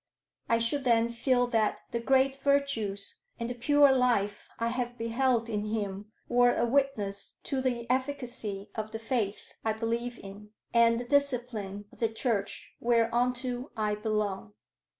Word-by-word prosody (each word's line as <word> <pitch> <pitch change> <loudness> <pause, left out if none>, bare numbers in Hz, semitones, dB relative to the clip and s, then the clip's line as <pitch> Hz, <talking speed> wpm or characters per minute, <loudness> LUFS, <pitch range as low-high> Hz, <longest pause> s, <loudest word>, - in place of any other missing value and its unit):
I 230 - +4
should 230 +5 +1
then 235 -2 +3
feel 245 +1 +2
that 225 -3 +1
the 235 - -1
great 265 +2 +3
virtues 270 -8 0 0.2
and 235 - -2
the 245 - -3
pure 285 +3 +5
life 230 -6 +1
I 230 0 0
have 245 0 -3
beheld 235 0 +1
in 210 -2 -2
him 210 -1 -3 0.2
were 245 0 +4
a 235 - +2
witness 235 -6 -1
to 270 -1 -1
the 245 -3 -1
efficacy 250 -6 -2
of 220 -1 -4
the 225 - -5
faith 225 -3 -2
I 220 - +1
believe 230 +2 -2
in 205 +2 -11 0.2
and 230 0 +5
the 245 - -5
discipline 240 -8 0
of - - -18
the 225 - +2
Church 220 -3 -2
whereunto 245 +2 +1
I 210 -1 +1
belong." 210 - -2
235 Hz, 150 wpm, -29 LUFS, 215-250 Hz, 0.2 s, pure